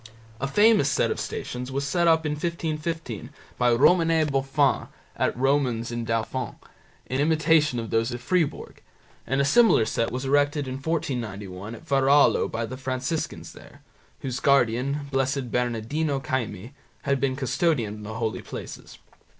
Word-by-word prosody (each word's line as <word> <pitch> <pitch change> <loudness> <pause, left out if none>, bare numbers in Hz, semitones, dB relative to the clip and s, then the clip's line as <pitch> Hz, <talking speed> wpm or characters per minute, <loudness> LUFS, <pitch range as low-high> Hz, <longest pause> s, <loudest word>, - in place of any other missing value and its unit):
A 135 - -1
famous 210 -2 +4
set - - +1
of - - -3
Stations 125 +1 -5
was 140 +1 -2
set 170 +4 +1
up 160 -1 +4
in 150 - 0
1515 155 - -3 0.3
by 125 -1 +4
Romanet 160 +4 +4
Bofin 135 +1 +1 0.3
at - - 0
Romans 130 -4 +1
in 120 -1 -3
Dauphine, 115 +2 -2 0.5
in 130 - -3
imitation 155 -2 +3
of 115 -2 -4
those 115 +2 +1
at 120 - -4
Fribourg, 165 +4 -1 0.5
and 135 - 0
a 140 - +3
similar 220 - +5
set 115 - -1
was 130 +2 -4
erected 145 +1 +2
in 130 - -4
1491 110 - -4
at 165 - -14
Varallo 140 +1 +4
by 115 0 -3
the 130 +3 -7
Franciscans 130 +4 -3
there, - - -16 0.4
whose 130 -2 -3
guardian, 140 +1 +2
Blessed 135 -2 -1
Bernardino 125 +5 -1
Caimi, 120 -4 -3 0.3
had 140 -1 +1
been 130 -1 0
custodian 130 -4 0
of - - -10
the 110 +1 -6
holy 115 -1 -2
places. - - -9
135 Hz, 150 wpm, -25 LUFS, 120-150 Hz, 0.5 s, similar